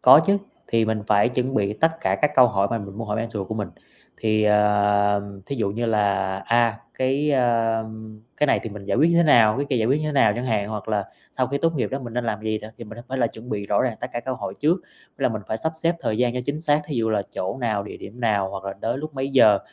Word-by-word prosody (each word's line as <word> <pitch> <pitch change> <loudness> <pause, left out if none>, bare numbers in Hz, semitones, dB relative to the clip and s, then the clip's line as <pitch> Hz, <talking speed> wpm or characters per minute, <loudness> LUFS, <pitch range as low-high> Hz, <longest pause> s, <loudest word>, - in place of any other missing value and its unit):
Có 130 +4 +9
chứ, 200 0 +3 0.3
thì 115 -1 +2
mình 110 -1 -1
phải 105 +1 +4
chuẩn 125 +1 -2
bị 100 -1 +1
tất 160 +9 +2
cả - - +1
các 150 - +4
câu 130 -2 +7
hỏi 100 -3 +1
mà 115 - 0
mình 100 -1 -9
muốn 115 -2 -5
hỏi 105 - -1
mentor 110 -4 -4
của 110 - -3
mình. 105 -2 -3 0.5
Thì, 110 -1 +1
à, 105 -1 +3 0.3
thí 140 - -4
dụ 110 -5 0
như 115 +3 -2
là, 100 -3 +1
a, 115 -1 +2 0.2
cái, 135 +3 0
a, 115 -4 +2 0.5
cái 150 - +2
này - - +2
thì 115 - -5
mình 100 -1 -9
giải 100 - -1
quyết 160 +4 +5
như 170 - +3
thế 170 - +6
nào, 115 -9 +5
cái 140 +2 -1
kia 130 - +2
giải 110 -2 +1
quyết 135 +5 +2
như 155 - -2
thế 150 - -2
nào 115 -7 +4
chẳng 125 +2 -3
hạn 105 -4 0
hoặc 105 -2 -5
là 105 -2 0 0.3
sau 130 - -1
khi 140 +3 -2
tốt 165 +2 +1
nghiệp 130 - 0
đó 135 - -2
mình 120 -4 -8
nên 125 0 -1
làm 110 -2 -2
gì 110 0 -1
nè. 110 - -8
Thì 115 - -7
mình 110 +1 -11
nên 135 0 -3
phải 120 - +3
chuẩn 110 +2 -12
bị 105 -3 -3
rõ 100 - +2
ràng 120 -4 -1
tất 125 - -3
cả 120 - -2
các - - -9
câu 130 - -2
hỏi - - -5
trước, 155 +4 +3 0.4
là 135 - +1
mình 110 -3 -4
phải 110 - -1
sắp 160 +7 -2
xếp 170 +1 +2
thời 110 - -1
gian 125 -1 +1
cho 125 - -1
chính 145 +3 -3
xác, 150 -1 +2
thí 150 - -4
dụ 115 -1 +1
là 105 -2 +1
chỗ 95 +1 -3
nào, 110 -4 0
địa 100 - -9
điểm 115 +5 -11
nào 105 -5 +1
hoặc 95 -1 -7
là 100 - -3
tới 120 +3 -1
lúc 155 +1 -7
mấy 135 0 -2
giờ, 110 -6 +6
115 Hz, 290 wpm, -23 LUFS, 105-130 Hz, 0.5 s, Có